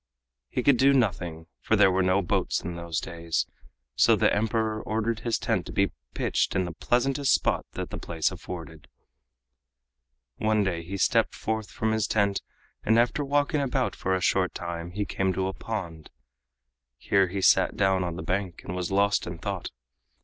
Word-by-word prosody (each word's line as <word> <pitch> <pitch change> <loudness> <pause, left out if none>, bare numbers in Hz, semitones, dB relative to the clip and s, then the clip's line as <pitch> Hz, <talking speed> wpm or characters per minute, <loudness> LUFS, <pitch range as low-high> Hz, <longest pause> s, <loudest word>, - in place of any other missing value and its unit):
He 125 - -2
could 140 -1 +5
do 135 +3 +5
nothing, 90 -10 0
for - - +1
there 95 - +5
were 95 +1 +2
no 95 +2 +2
boats - - 0
in 85 +1 -5
those 85 -1 -3
days, 85 -1 -2 0.5
so - - +5
the - - +3
Emperor 110 0 0
ordered 110 +1 -1
his 115 -1 0
tent - - -1
to - - -7
be - - +1 0.2
pitched - - 0
in 95 - +1
the 85 - -4
pleasantest 130 - +1
spot - - +1
that - - -5
the - - -5
place 80 -2 -1
afforded. 80 -3 -8 1.5
One 110 -1 +2
day 90 -4 -1
he 95 +4 -6
stepped - - +2
forth 110 -1 -3
from 110 0 -1
his 110 -2 +1
tent 100 -2 +1 0.4
and 110 +1 +3
after 120 +5 +2
walking 145 +1 +1
about 130 -1 0
for 95 0 0
a 90 - -2
short 90 0 +1
time 85 -1 -5
he 100 +3 -3
came 95 -1 0
to 95 +1 -1
a 95 - -2
pond. 85 -10 -6 0.9
Here 95 +10 +2
he 100 +3 -4
sat - - +4
down 95 -1 +2
on 85 -2 -3
the 95 - -6
bank 95 -2 -2
and 90 - -5
was 90 -1 -2
lost 100 -1 +2
in 85 0 -5
thought. 95 +2 -4
95 Hz, 185 wpm, -27 LUFS, 85-110 Hz, 1.5 s, could